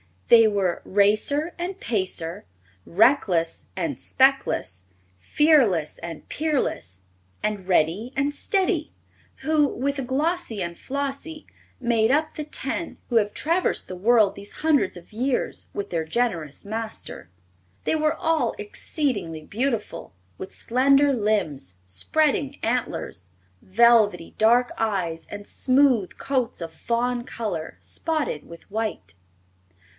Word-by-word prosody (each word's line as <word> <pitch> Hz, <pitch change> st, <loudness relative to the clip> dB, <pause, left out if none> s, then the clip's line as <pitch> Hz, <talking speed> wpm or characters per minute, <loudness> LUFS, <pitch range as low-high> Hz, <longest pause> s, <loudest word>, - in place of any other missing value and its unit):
They 230 Hz, -1 st, +8 dB
were 195 Hz, -4 st, 0 dB
Racer 215 Hz, -, +2 dB
and 365 Hz, +2 st, -4 dB
Pacer, 185 Hz, -4 st, -2 dB, 0.4 s
Reckless 185 Hz, -5 st, +2 dB
and -, -, -2 dB
Speckless, 260 Hz, -, +1 dB, 0.3 s
Fearless 210 Hz, -, +3 dB
and 165 Hz, -2 st, -8 dB
Peerless, 95 Hz, -, -2 dB, 0.4 s
and 210 Hz, -3 st, -2 dB
Ready 185 Hz, +7 st, +2 dB
and 280 Hz, +2 st, 0 dB
Steady, 375 Hz, -3 st, 0 dB, 0.5 s
who, 300 Hz, 0 st, +3 dB
with 275 Hz, 0 st, -2 dB
Glossie 290 Hz, -, -1 dB
and 170 Hz, 0 st, -5 dB
Flossie, 280 Hz, +3 st, -4 dB, 0.4 s
made 230 Hz, -2 st, +2 dB
up 310 Hz, +3 st, +1 dB
the 305 Hz, -, -5 dB
ten 300 Hz, +2 st, -4 dB
who 240 Hz, -, +3 dB
have 210 Hz, -2 st, +2 dB
traversed 335 Hz, +4 st, 0 dB
the 185 Hz, -, -5 dB
world 215 Hz, +1 st, +4 dB
these 200 Hz, +1 st, -9 dB
hundreds 295 Hz, -12 st, +3 dB
of 175 Hz, -1 st, -12 dB
years 250 Hz, +3 st, -1 dB
with 200 Hz, -, -4 dB
their 165 Hz, -2 st, -1 dB
generous 165 Hz, -, -1 dB
master. 220 Hz, -, -6 dB, 0.5 s
They -, -, +1 dB
were 310 Hz, 0 st, +1 dB
all 325 Hz, 0 st, 0 dB
exceedingly 280 Hz, -, -3 dB
beautiful, 230 Hz, -, -3 dB, 0.2 s
with 190 Hz, -, -8 dB
slender 275 Hz, +3 st, +3 dB
limbs, 195 Hz, -, -1 dB
spreading 280 Hz, -, 0 dB
antlers, 225 Hz, -, -2 dB, 0.3 s
velvety 205 Hz, -4 st, +4 dB
dark 240 Hz, +3 st, +4 dB
eyes 185 Hz, -7 st, -1 dB
and 205 Hz, 0 st, -7 dB
smooth 255 Hz, -7 st, +2 dB
coats 255 Hz, -8 st, -1 dB
of 165 Hz, -1 st, -6 dB
fawn 240 Hz, +5 st, -1 dB
color 210 Hz, -11 st, -4 dB
spotted 310 Hz, -, -2 dB
with 170 Hz, +3 st, -13 dB
white. 220 Hz, 0 st, -3 dB
230 Hz, 120 wpm, -24 LUFS, 185-280 Hz, 0.5 s, They